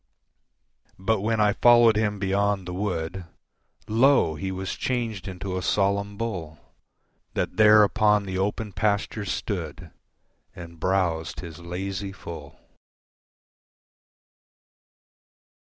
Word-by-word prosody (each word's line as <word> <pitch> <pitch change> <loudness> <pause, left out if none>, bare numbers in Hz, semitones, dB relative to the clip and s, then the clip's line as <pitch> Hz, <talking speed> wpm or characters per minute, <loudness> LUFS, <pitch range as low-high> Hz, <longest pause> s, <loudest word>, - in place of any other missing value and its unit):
But 95 +2 0
when 110 +1 0
I 105 -1 +4
followed 120 -1 +6
him 105 -1 0
beyond 100 -1 0
the 90 - -5
wood, 90 -2 -3 0.6
Lo! 120 - +4
He 85 +5 -4
was 95 0 -4
changed 115 -7 -3
into 95 0 -5
a - - -6
solemn 100 +2 0
bull 90 -9 -4 0.8
That - - -2
there 105 0 +7
upon 105 0 +3
the 95 -1 -3
open 105 +1 -2
pasture 105 +2 -1
stood 90 -4 -4 0.6
And 85 -1 -10
browsed 90 -3 -1
his 85 -3 -9
lazy 95 +3 -5
full. 80 -6 -10
95 Hz, 110 wpm, -25 LUFS, 90-105 Hz, 0.8 s, there